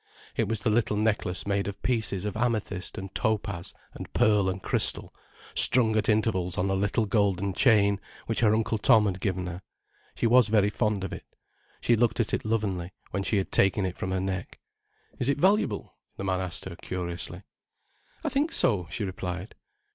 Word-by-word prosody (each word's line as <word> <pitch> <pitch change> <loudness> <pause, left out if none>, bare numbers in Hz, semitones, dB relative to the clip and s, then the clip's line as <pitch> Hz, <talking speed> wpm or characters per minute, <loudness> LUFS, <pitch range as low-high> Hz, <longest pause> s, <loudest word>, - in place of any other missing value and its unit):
It - - +1
was 110 -2 -1
the 110 - +1
little 105 -1 +1
necklace 105 -4 0
made 100 0 0
of 100 - -5
pieces 110 -6 0
of 105 - -3
amethyst 110 -5 -2
and 95 0 -7
topaz 100 -4 -1 0.2
and - - -9
pearl 105 -5 +3
and 95 +1 -3
crystal, - - +1 0.4
strung 115 -3 +5
at 110 - +1
intervals 100 -5 +1
on 95 +1 +1
a - - +2
little 100 +3 +1
golden 100 -2 +1
chain, 100 -3 +4 0.2
which 115 - 0
her 110 -2 +4
Uncle 110 0 0
Tom 110 -1 +5
had 95 -2 -1
given 95 -2 -1
her. 90 +1 -6 0.5
She - - -1
was 120 0 +5
very 105 -1 +3
fond 105 -3 0
of 95 - -4
it. - - -9 0.5
She 120 - +3
looked 115 +1 +1
at 115 - 0
it - - -1
lovingly, 100 -5 -1 0.2
when 100 - -1
she 100 +2 +1
had 95 - -2
taken 95 0 +3
it 90 -1 -3
from 95 - -4
her 95 0 0
neck. 95 -1 -4 0.6
"Is 125 - 0
it 140 - +2
valuable?" 185 - +1 0.2
the - - -5
man 95 -1 0
asked 90 -1 -4
her, 95 -2 -6
curiously. 85 -1 -5 0.8
"I - - 0
think 295 +4 0
so," 100 - +1
she 105 - -4
replied. 95 0 -5
100 Hz, 190 wpm, -27 LUFS, 95-110 Hz, 0.8 s, strung